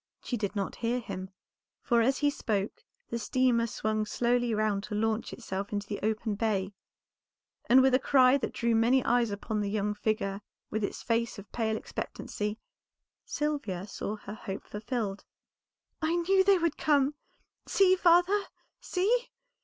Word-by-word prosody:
She 245 - -2
did 210 -2 -3
not 200 -2 -3
hear 240 +1 0
him, 190 -5 -6 0.5
for 235 -1 +3
as 265 +4 +2
he 290 -1 +2
spoke 210 -8 -2 0.3
the 235 - -1
steamer 240 -1 +2
swung 215 -1 -1
slowly 240 +2 +1
round 215 -2 +1
to 210 - -5
launch 220 +1 0
itself 200 -4 -5
into 205 -1 -2
the 205 - -4
open 220 +1 -1
bay, 200 -2 -1 1.0
and 260 +2 +7
with 265 -1 +4
a 255 - +5
cry 260 0 +5
that - - -3
drew 235 -1 0
many 235 +3 +3
eyes 240 -1 +3
upon 210 +1 -3
the 200 - -1
young 210 0 0
figure 210 -2 -1 0.3
with 215 0 -1
its - - -3
face 230 0 0
of 200 0 -11
pale 220 -2 0
expectancy, 210 0 -4 0.7
Sylvia 275 -12 -2
saw 210 +1 -4
her 205 -1 -9
hope 195 -2 -6
fulfilled. 210 -2 -4 0.8
"I 315 +2 +1
knew 380 +3 +3
they 390 0 +5
would 335 -3 0
come! 285 -2 +3 0.5
See, 375 -1 +5
father, 360 +3 +4 0.3
see! 455 +7 +1
230 Hz, 160 wpm, -29 LUFS, 210-265 Hz, 1.0 s, and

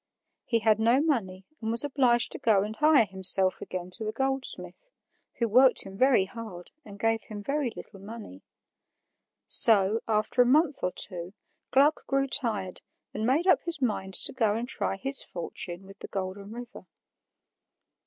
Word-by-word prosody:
He 230 - 0
had 215 -1 +2
no 230 +4 +2
money 205 - -2 0.2
and 220 - -4
was 230 +3 +3
obliged 255 -4 +1
to - - -5
go 205 -4 +2
and 215 +1 -6
hire 300 -4 +3
himself 190 -1 +3
again 185 0 -7
to 220 - -1
the 215 - -3
goldsmith, 270 - -1 0.5
who 235 - -1
worked 250 +3 +4
him 195 0 -11
very 250 -3 +2
hard 190 -5 -11
and 200 -1 -13
gave 225 0 -1
him 205 -1 -9
very 280 +1 -2
little 195 - -11
money. 205 - -11 1.0
So, 210 0 +6
after 215 +2 +1
a - - +4
month 295 +2 +2
or 180 - 0
two, 180 0 -3 0.3
Gluck 285 +4 +1
grew 275 0 0
tired 210 -8 -2 0.3
and 215 +2 -3
made 290 +7 +1
up 375 - +3
his 340 -3 -3
mind 200 -7 -3
to - - -2
go 220 -5 0
and 235 +2 -4
try 250 - -1
his 270 +7 +1
fortune 175 +1 -6
with 195 +1 -15
the - - -8
Golden 195 +1 -6
River. 240 +1 -11
225 Hz, 170 wpm, -26 LUFS, 195-260 Hz, 1.0 s, So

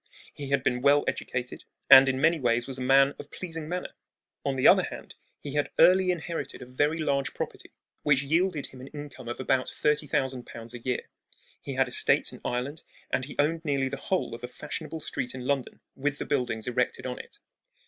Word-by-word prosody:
He 140 -2 -7
had 140 -2 +1
been 125 -2 +1
well 145 +2 +5
educated, 125 -1 -3 0.2
and 135 0 +10
in 130 0 0
many 165 +3 +3
ways 120 -2 +1
was 135 -1 -4
a - - -5
man 135 +2 +5
of 145 - -9
pleasing 165 -3 -6
manner. 180 +1 -4 0.5
On 140 -1 -1
the 130 - +4
other - - +7
hand, - - -7 0.3
he 145 - -7
had 145 -1 0
early 185 +1 +6
inherited 165 -5 -3
a - - -8
very 145 +5 0
large 140 -5 -1
property - - -5 0.3
which 140 -2 +3
yielded 160 +1 +1
him 130 - -11
an 130 - -9
income 145 -4 -9
of 120 - -5
about 130 0 +1
thirty 150 0 0
thousand 130 -2 -1
pounds 115 0 -8
a 120 - -7
year. 125 +1 -2 0.5
He 135 - -5
had 130 0 +3
estates 125 - +3
in - - -11
Ireland, 130 +6 -3 0.3
and 130 - +1
he 145 - -9
owned 160 +3 +1
nearly 140 -4 0
the 140 - -4
whole 185 -3 -1
of 120 +1 -8
a - - -3
fashionable 155 +5 -6
street 130 -3 -4
in 125 -1 -6
London, 135 -1 -2
with 145 +1 -1
the - - -4
buildings 125 -6 -1
erected 125 0 -1
on 125 -1 -4
it. - - -11
135 Hz, 210 wpm, -28 LUFS, 125-150 Hz, 0.5 s, and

